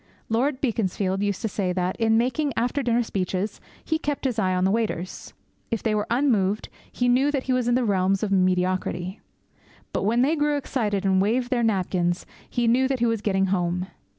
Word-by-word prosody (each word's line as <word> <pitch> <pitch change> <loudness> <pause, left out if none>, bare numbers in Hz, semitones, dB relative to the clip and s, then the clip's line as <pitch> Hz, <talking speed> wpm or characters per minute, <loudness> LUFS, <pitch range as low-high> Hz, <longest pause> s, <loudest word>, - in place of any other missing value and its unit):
Lord 255 +5 +1
Beaconsfield 195 -5 0
used 205 0 -1
to - - +1
say 195 -3 -1
that, 180 0 -1
in 225 -1 +3
making 265 +4 0
after 250 +5 0
dinner 240 -1 +2
speeches, 190 -1 -3 0.2
he 320 -1 0
kept 290 -3 -3
his 245 -4 0
eye 185 -3 +1
on 180 - +1
the 190 - +3
waiters. 210 -5 -3 0.3
If 230 -3 -2
they 220 - +1
were 210 0 0
unmoved, 220 -6 +1 0.2
he 245 - 0
knew 255 +4 +4
that 280 -3 -1
he 260 - 0
was 250 -2 +1
in 240 - +3
the 250 -1 +1
realms 195 -1 +1
of 205 - -1
mediocrity. 185 0 0 0.7
But - - 0
when 230 +5 +2
they 300 +5 +2
grew 295 -1 +1
excited 210 -8 -1
and 190 -1 +3
waved 240 +5 0
their 245 -2 +2
napkins, 185 -5 0 0.2
he 240 -1 0
knew 255 +3 +4
that 270 0 0
he 240 - +1
was 230 -2 0
getting 195 -2 +1
home. 180 0 -1
220 Hz, 205 wpm, -25 LUFS, 190-250 Hz, 0.7 s, knew